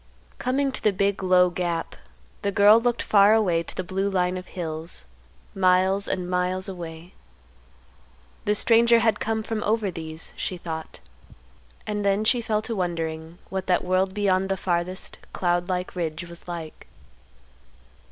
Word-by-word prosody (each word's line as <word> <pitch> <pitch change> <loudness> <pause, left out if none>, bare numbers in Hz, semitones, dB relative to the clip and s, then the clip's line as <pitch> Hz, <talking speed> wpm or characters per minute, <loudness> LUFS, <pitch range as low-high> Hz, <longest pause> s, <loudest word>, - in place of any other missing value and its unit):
Coming 270 +2 0
to - - -4
the 210 - +3
big, 200 +1 0
low 180 -1 +4
gap, 170 -2 -2 0.5
the 200 - 0
girl 205 +3 +6
looked 240 0 0
far 205 +1 +5
away 180 -7 +2
to 170 - -8
the 185 - -2
blue 195 +2 -1
line 180 -1 +1
of 185 0 -6
hills, 160 - -5 0.5
miles, 190 +1 +3
and 180 -1 -2
miles 180 +1 -1
away. 170 -2 -8 1.3
The 210 - +2
stranger 235 +2 +5
had 225 -2 +2
come 220 0 -1
from 220 -1 -3
over 215 -2 +1
these, 160 -1 -7
she 185 - -3
thought; 160 -2 -6 0.8
and 210 -1 -2
then 200 +1 +2
she 240 +2 +3
fell 215 -1 -1
to 230 - -3
wondering 165 -2 -3
what 190 -1 -4
that 180 - +2
world 185 +1 +1
beyond 195 -2 +1
the 195 - 0
farthest 180 0 -2
cloud 175 0 0
like 180 0 -2
ridge 170 -1 -3
was 170 0 -11
like. 165 -3 -7
185 Hz, 155 wpm, -25 LUFS, 175-205 Hz, 1.3 s, girl